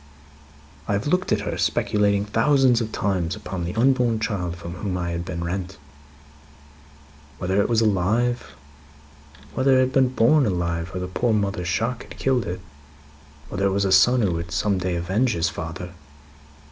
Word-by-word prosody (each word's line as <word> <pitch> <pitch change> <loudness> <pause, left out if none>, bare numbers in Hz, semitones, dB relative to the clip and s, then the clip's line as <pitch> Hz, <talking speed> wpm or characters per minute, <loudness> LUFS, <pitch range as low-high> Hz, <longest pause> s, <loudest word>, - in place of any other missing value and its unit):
"I - - 0
have 100 +3 -1
looked 180 +5 0
at 105 - +2
her, 105 - -3
speculating 100 -1 +1
thousands 125 +2 +3
of 110 -1 -4
times 95 -6 -1
upon 90 -2 -5
the 90 - -5
unborn 120 -1 +2
child 95 -6 -2
from 85 0 -8
whom 90 0 -3
I 85 -1 -2
had 85 0 -3
been 85 -1 -5
rent. 90 +1 -4 1.6
Whether 95 +2 +1
it - - 0
was 115 -1 +3
alive. 110 -2 0 1.0
Whether 130 0 +3
it - - +5
had 130 0 0
been 130 -1 +4
born 130 +4 +3
alive, 85 -2 -2
or - - -2
the 90 - -3
poor 115 +5 0
mother's 100 -4 -1
shock 115 +7 -1
had - - -12
killed 130 -3 0
it. 90 +2 -4 0.9
Whether 100 +6 0
it 95 - 0
was 100 0 +1
a 95 - 0
son 120 +6 +5
who 95 - +2
would 85 0 -4
some 95 +3 0
day 90 -1 -1
avenge 95 +9 0
his 85 0 0
father. 85 +2 -6
100 Hz, 175 wpm, -23 LUFS, 90-115 Hz, 1.6 s, it